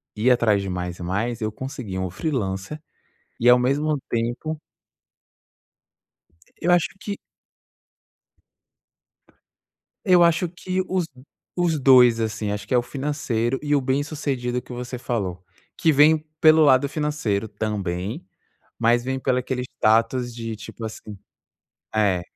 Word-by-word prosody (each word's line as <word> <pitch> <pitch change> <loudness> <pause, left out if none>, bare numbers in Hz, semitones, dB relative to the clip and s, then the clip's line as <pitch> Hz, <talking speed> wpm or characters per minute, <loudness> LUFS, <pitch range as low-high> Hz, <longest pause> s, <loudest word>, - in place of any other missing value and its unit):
ir 110 +4 +2
atrás 110 -5 +3
de 95 - -4
mais 90 -1 -4
e - - -6
mais, 110 +7 -2
eu 110 0 -1
consegui 125 -5 -6
um 95 -1 -2
freelancer 105 - -3 0.6
e, 120 - +2
ao 125 0 +7
mesmo 145 +4 +1
tempo 120 +7 -2 2.0
Eu 175 - +1
acho 175 -2 +3
que 200 -1 -5 2.9
Eu 180 -4 +6
acho 170 +1 +2
que 185 +2 -3
os 185 -1 0 0.5
os 170 -3 +1
dois 125 -4 +6
assim, 110 -1 -2
acho 105 - -5
que - - -7
é 125 - +5
o - - +4
financeiro 135 -3 -2
e 145 0 +1
o 140 - +3
bem-sucedido 130 -3 -2
que 125 - -11
você 125 +1 -5
falou, 95 -7 -3 0.3
que 160 - +3
vem 150 +2 +6 0.2
pelo 155 0 +7
lado 140 0 +5
financeiro 140 -9 -1
também, 105 - -3 0.5
mas 120 +1 +3
vem 130 0 -1
pelo 125 -1 +1
aquele 125 0 -2 0.2
status 115 +3 +2
de 115 -1 -5
tipo 110 +1 -10
assim 110 -1 -7 0.8
é. 100 -5 +2
125 Hz, 135 wpm, -23 LUFS, 110-145 Hz, 2.9 s, ao